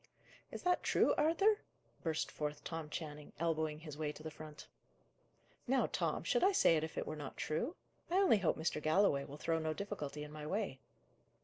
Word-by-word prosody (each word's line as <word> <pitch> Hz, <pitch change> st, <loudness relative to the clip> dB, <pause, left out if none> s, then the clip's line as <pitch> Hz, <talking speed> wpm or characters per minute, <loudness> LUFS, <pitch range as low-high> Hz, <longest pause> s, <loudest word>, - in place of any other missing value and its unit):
"Is -, -, -7 dB
that 360 Hz, 0 st, +3 dB
true, -, -, +4 dB
Arthur?" 390 Hz, +7 st, +4 dB, 0.4 s
burst 160 Hz, -2 st, -1 dB
forth 150 Hz, -1 st, -3 dB
Tom 160 Hz, -2 st, -4 dB
Channing, 150 Hz, -1 st, -6 dB
elbowing 160 Hz, -2 st, 0 dB
his 150 Hz, -2 st, -8 dB
way 150 Hz, -1 st, 0 dB
to 155 Hz, -, -11 dB
the 160 Hz, -, -5 dB
front. 155 Hz, -1 st, -10 dB, 1.0 s
"Now, 265 Hz, +2 st, +3 dB
Tom, -, -, 0 dB
should -, -, +2 dB
I 390 Hz, +2 st, +5 dB
say 165 Hz, -, +6 dB
it 155 Hz, -, +1 dB
if 160 Hz, -, -5 dB
it -, -, -1 dB
were 155 Hz, -, -4 dB
not 145 Hz, -3 st, -7 dB
true? 235 Hz, -, -1 dB, 0.3 s
I 350 Hz, -, 0 dB
only 375 Hz, -, +5 dB
hope 180 Hz, -, +2 dB
Mr. 160 Hz, -1 st, -1 dB
Galloway 155 Hz, -3 st, +3 dB
will 145 Hz, -, -9 dB
throw 165 Hz, +1 st, 0 dB
no 155 Hz, 0 st, -1 dB
difficulty 150 Hz, -8 st, -4 dB
in 150 Hz, -, -8 dB
my 150 Hz, 0 st, -6 dB
way." 190 Hz, -8 st, -2 dB
155 Hz, 195 wpm, -36 LUFS, 150-200 Hz, 1.0 s, say